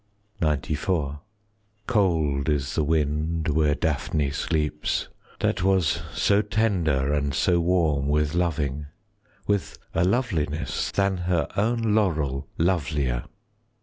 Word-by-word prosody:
XCIV 75 Hz, 0 st, -1 dB, 0.7 s
Cold 80 Hz, -, +1 dB
is 70 Hz, -2 st, 0 dB
the 80 Hz, -, +1 dB
wind 80 Hz, +1 st, 0 dB
where 75 Hz, -1 st, +2 dB
Daphne 75 Hz, -2 st, -1 dB
sleeps, 75 Hz, 0 st, -1 dB, 0.3 s
That 95 Hz, -, +1 dB
was 90 Hz, -4 st, +2 dB
so 100 Hz, +4 st, +3 dB
tender 90 Hz, -10 st, +1 dB
and 70 Hz, -1 st, 0 dB
so 85 Hz, +3 st, +3 dB
warm 80 Hz, -5 st, +1 dB
With 75 Hz, 0 st, +1 dB
loving,—with 90 Hz, -, -3 dB, 0.2 s
a 85 Hz, -, +2 dB
loveliness 90 Hz, -, 0 dB
Than 100 Hz, -1 st, +1 dB
her 90 Hz, -3 st, 0 dB
own 115 Hz, +1 st, +1 dB
laurel 80 Hz, -10 st, 0 dB
lovelier. 75 Hz, -8 st, 0 dB
80 Hz, 105 wpm, -25 LUFS, 75-95 Hz, 0.7 s, so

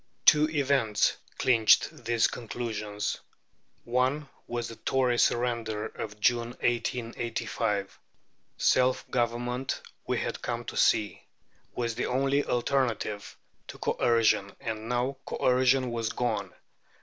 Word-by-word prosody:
Two 150 Hz, +1 st, +6 dB
events 140 Hz, -8 st, +2 dB, 0.2 s
clinched 115 Hz, 0 st, +3 dB
these 115 Hz, -1 st, +3 dB
conclusions. 110 Hz, -3 st, -3 dB, 0.6 s
One 130 Hz, +4 st, 0 dB, 0.2 s
was 120 Hz, -1 st, -3 dB
the 115 Hz, -, -9 dB
Tory 125 Hz, -2 st, +1 dB
surrender 115 Hz, -3 st, +1 dB
of 105 Hz, -1 st, -7 dB
June, 120 Hz, +2 st, +1 dB
1885. 115 Hz, -4 st, -2 dB, 0.6 s
Self 130 Hz, 0 st, +2 dB
government, 120 Hz, +1 st, -1 dB, 0.3 s
we -, -, 0 dB
had -, -, -3 dB
come -, -, -3 dB
to -, -, -6 dB
see, 105 Hz, -2 st, +2 dB, 0.5 s
was 115 Hz, -1 st, -1 dB
the -, -, -2 dB
only 135 Hz, +2 st, +1 dB
alternative 120 Hz, -5 st, -1 dB, 0.3 s
to -, -, -9 dB
Coercion, 115 Hz, -4 st, +2 dB
and 110 Hz, 0 st, -5 dB
now 125 Hz, +3 st, 0 dB
Coercion 130 Hz, 0 st, +2 dB
was 115 Hz, -2 st, -1 dB
gone. 120 Hz, -3 st, -2 dB
120 Hz, 110 wpm, -28 LUFS, 110-125 Hz, 0.6 s, Two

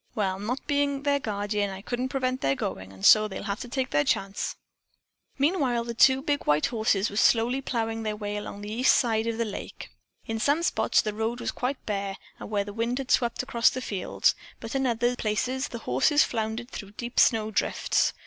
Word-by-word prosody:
Well, 195 Hz, -4 st, -1 dB
not 245 Hz, +6 st, -3 dB
being 285 Hz, -1 st, 0 dB
their 285 Hz, -1 st, +2 dB
guardeen, 205 Hz, -3 st, -2 dB
I 195 Hz, 0 st, -8 dB
couldn't 245 Hz, +3 st, -2 dB
prevent 255 Hz, -1 st, -1 dB
their 135 Hz, -, +2 dB
goin', 95 Hz, -6 st, -5 dB
and 95 Hz, 0 st, -6 dB
so 215 Hz, 0 st, +7 dB
they'll 190 Hz, -, -6 dB
have 200 Hz, 0 st, -3 dB
to 250 Hz, -, -6 dB
take 260 Hz, +1 st, -2 dB
their 145 Hz, 0 st, +3 dB
chance." 195 Hz, +5 st, -1 dB, 0.8 s
Meanwhile 275 Hz, -5 st, +1 dB
the 235 Hz, 0 st, -5 dB
two 265 Hz, +3 st, +5 dB
big 290 Hz, -1 st, -1 dB
white 150 Hz, +1 st, +3 dB
horses 220 Hz, -3 st, +1 dB
were 205 Hz, -, -6 dB
slowly 240 Hz, +4 st, +3 dB
ploughing 225 Hz, -3 st, -2 dB
their 215 Hz, -1 st, -2 dB
way 205 Hz, -1 st, -4 dB
along 205 Hz, -1 st, -6 dB
the 205 Hz, +1 st, -6 dB
east 250 Hz, +3 st, +4 dB
side 225 Hz, -2 st, +1 dB
of 230 Hz, -1 st, -2 dB
the 230 Hz, -, 0 dB
lake. 210 Hz, -, -7 dB, 0.3 s
In 225 Hz, 0 st, -3 dB
some 285 Hz, +8 st, +2 dB
spots -, -, +2 dB
the 215 Hz, -, -2 dB
road 225 Hz, +3 st, -2 dB
was -, -, -2 dB
quite 255 Hz, +2 st, -3 dB
bare 200 Hz, -2 st, -3 dB, 0.2 s
where 205 Hz, -1 st, -2 dB
the 205 Hz, 0 st, -8 dB
wind 230 Hz, +3 st, -1 dB
had 270 Hz, 0 st, -4 dB
swept 240 Hz, 0 st, +2 dB
across 235 Hz, -3 st, +3 dB
the 255 Hz, -, -4 dB
fields, 200 Hz, -7 st, 0 dB, 0.3 s
but 225 Hz, -, -7 dB
in 270 Hz, -1 st, +1 dB
other 240 Hz, +1 st, +1 dB
places 245 Hz, +5 st, -1 dB
the 235 Hz, -, -6 dB
horses 225 Hz, -, +3 dB
floundered 225 Hz, +2 st, -3 dB
through 200 Hz, -1 st, -8 dB
deep 235 Hz, +3 st, -3 dB
snow 220 Hz, -2 st, +4 dB
drifts. -, -, +1 dB
225 Hz, 205 wpm, -27 LUFS, 205-255 Hz, 0.8 s, so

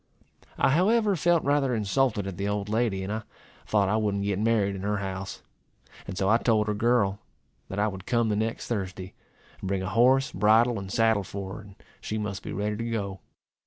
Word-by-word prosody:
I -, -, +3 dB
however 205 Hz, -, +3 dB
felt 170 Hz, 0 st, +2 dB
rather 140 Hz, -3 st, +2 dB
insulted 110 Hz, 0 st, +1 dB
at 95 Hz, -2 st, -5 dB
the 100 Hz, +1 st, -2 dB
old 105 Hz, 0 st, -2 dB
lady, 110 Hz, -3 st, 0 dB
and 100 Hz, +3 st, -3 dB
I 110 Hz, -, -3 dB, 0.5 s
thought 105 Hz, -2 st, +2 dB
I 105 Hz, +3 st, +1 dB
wouldn't 100 Hz, -2 st, 0 dB
get 100 Hz, -1 st, -1 dB
married 110 Hz, -3 st, +2 dB
in 95 Hz, -, -6 dB
her 105 Hz, +1 st, -1 dB
house. 95 Hz, -1 st, -5 dB, 0.6 s
And 95 Hz, -, -6 dB
so 95 Hz, -, +1 dB
I 110 Hz, +3 st, +5 dB
told 110 Hz, -3 st, +2 dB
her 105 Hz, -, -1 dB
girl, 105 Hz, -2 st, +2 dB, 0.5 s
that 95 Hz, -, -5 dB
I 105 Hz, +1 st, +2 dB
would 95 Hz, -2 st, -7 dB
come 120 Hz, -2 st, +2 dB
the 105 Hz, -, +1 dB
next 110 Hz, +2 st, -2 dB
Thursday, 95 Hz, -4 st, -4 dB, 0.5 s
and -, -, -5 dB
bring 95 Hz, 0 st, -1 dB
a 95 Hz, -, -3 dB
horse, 130 Hz, +5 st, +4 dB
bridle, 110 Hz, +4 st, +3 dB
and 95 Hz, -1 st, -7 dB
saddle 110 Hz, -2 st, +3 dB
for 95 Hz, 0 st, -6 dB
her, -, -, -9 dB
and 100 Hz, -2 st, -14 dB, 0.3 s
she 110 Hz, -, -3 dB
must 100 Hz, -3 st, -4 dB
be -, -, -7 dB
ready 105 Hz, +1 st, -2 dB
to 115 Hz, +1 st, -3 dB
go. 100 Hz, -4 st, -3 dB
105 Hz, 210 wpm, -27 LUFS, 100-115 Hz, 0.6 s, I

